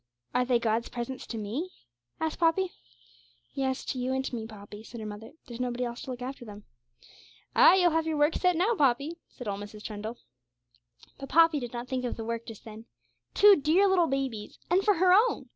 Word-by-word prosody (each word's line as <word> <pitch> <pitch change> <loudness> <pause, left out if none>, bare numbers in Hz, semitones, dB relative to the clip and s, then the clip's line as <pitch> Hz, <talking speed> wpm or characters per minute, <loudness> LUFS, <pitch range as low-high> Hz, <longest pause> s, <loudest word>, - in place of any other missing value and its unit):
'Are 250 - +2
they 250 -1 +3
God's 230 0 -1
presents 245 +1 -6
to 230 - -5
me?' 230 - -4 0.5
asked 320 -1 -2
Poppy. 350 +2 +2 0.8
'Yes, 265 -1 -2
to 255 - -3
you 255 +1 -1
and 265 0 -1
to - - -5
me, 225 -1 -5
Poppy,' 205 -1 -11
said 230 +1 -10
her 220 - -6
mother; 210 +1 -8
'there's 235 -1 -9
nobody 250 0 -2
else 240 0 -5
to 295 - -8
look 250 -1 -5
after 260 0 -6
them.' 210 -2 -11 0.9
'Ay, - - +8
you'll 355 -2 +4
have 325 0 0
your 315 -1 -1
work 295 +2 +3
set 360 -1 +2
now, 375 +8 +2
Poppy,' 285 - +1
said 245 - -10
old 200 -1 -3
Mrs. 210 +1 -9
Trundle. 215 +2 -6 1.0
But 275 -1 -8
Poppy 330 -2 +5
did 245 -3 -6
not 240 0 -6
think 255 -1 -2
of 245 - -3
the 225 - -5
work 230 0 -4
just 225 -3 -10
then. 220 0 -10 0.5
Two 410 -1 +8
dear 330 +6 +3
little 365 -3 +3
babies! 265 -7 -3
And 375 +2 +4
for 415 -1 +4
her 365 +1 +4
own! 440 +6 +3
255 Hz, 210 wpm, -28 LUFS, 230-325 Hz, 1.0 s, Ay